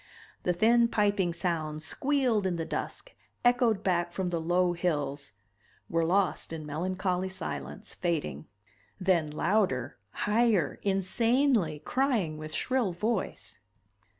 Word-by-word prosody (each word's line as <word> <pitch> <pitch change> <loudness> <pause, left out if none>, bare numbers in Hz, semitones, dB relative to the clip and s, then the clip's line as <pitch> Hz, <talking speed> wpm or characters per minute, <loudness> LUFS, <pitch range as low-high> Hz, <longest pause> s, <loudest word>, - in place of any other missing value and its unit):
The 180 - +1
thin 235 +6 +4
piping 205 -5 +1
sounds 160 -3 -2
squealed 260 -8 +1
in 180 - -1
the 165 -1 -3
dusk, - - -5 0.3
echoed 245 -4 +3
back 175 -2 +1
from 180 0 -2
the 170 -1 -1
low 175 +2 +2
hills, 145 - -2 0.6
were 165 0 +2
lost 180 0 +1
in 160 -2 -5
melancholy 185 +4 -1
silence, 75 - -6
fading. 155 - -2 0.5
Then 180 -5 +2
louder, 150 - 0 0.3
higher, 210 -6 +2
insanely, 200 - +1
crying 225 - 0
with 155 0 -7
shrill 230 - 0
voice. 200 - -3
180 Hz, 120 wpm, -29 LUFS, 160-215 Hz, 0.6 s, thin